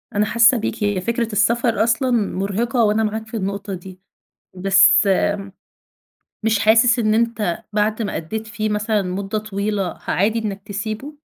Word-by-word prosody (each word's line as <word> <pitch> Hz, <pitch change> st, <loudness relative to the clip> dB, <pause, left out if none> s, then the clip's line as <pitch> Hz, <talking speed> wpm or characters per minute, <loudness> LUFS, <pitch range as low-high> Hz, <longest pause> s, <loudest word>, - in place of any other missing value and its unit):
أنا 210 Hz, -, +2 dB
حاسة 235 Hz, +3 st, +4 dB
بيك، 220 Hz, -1 st, -3 dB
هي 205 Hz, -3 st, 0 dB
فكرة 235 Hz, +2 st, -2 dB
السفر 235 Hz, +2 st, +2 dB
أصلًا 235 Hz, +3 st, +1 dB
مرهقة 225 Hz, +2 st, 0 dB
وأنا 215 Hz, +1 st, +2 dB
معاك 220 Hz, +1 st, -3 dB
في 225 Hz, 0 st, -5 dB
النقطة 200 Hz, 0 st, -4 dB
دي. 185 Hz, 0 st, -9 dB, 0.6 s
بس 195 Hz, +2 st, +5 dB, 1.3 s
مش 225 Hz, -1 st, +1 dB
حاسس 225 Hz, +3 st, +4 dB
إن 215 Hz, -2 st, +1 dB
أنت 225 Hz, -6 st, -1 dB
بعد 215 Hz, +2 st, 0 dB
ما 205 Hz, -, -3 dB
أدّيت 215 Hz, +7 st, -5 dB
فيه 215 Hz, -1 st, -3 dB
مثلًا 210 Hz, 0 st, 0 dB
مدة 195 Hz, +3 st, -3 dB
طويلة 205 Hz, -2 st, -3 dB
عادي 215 Hz, +4 st, +1 dB
إنك 205 Hz, -3 st, -4 dB
تسيبه؟ 215 Hz, +8 st, -5 dB
215 Hz, 150 wpm, -20 LUFS, 200-225 Hz, 1.3 s, بس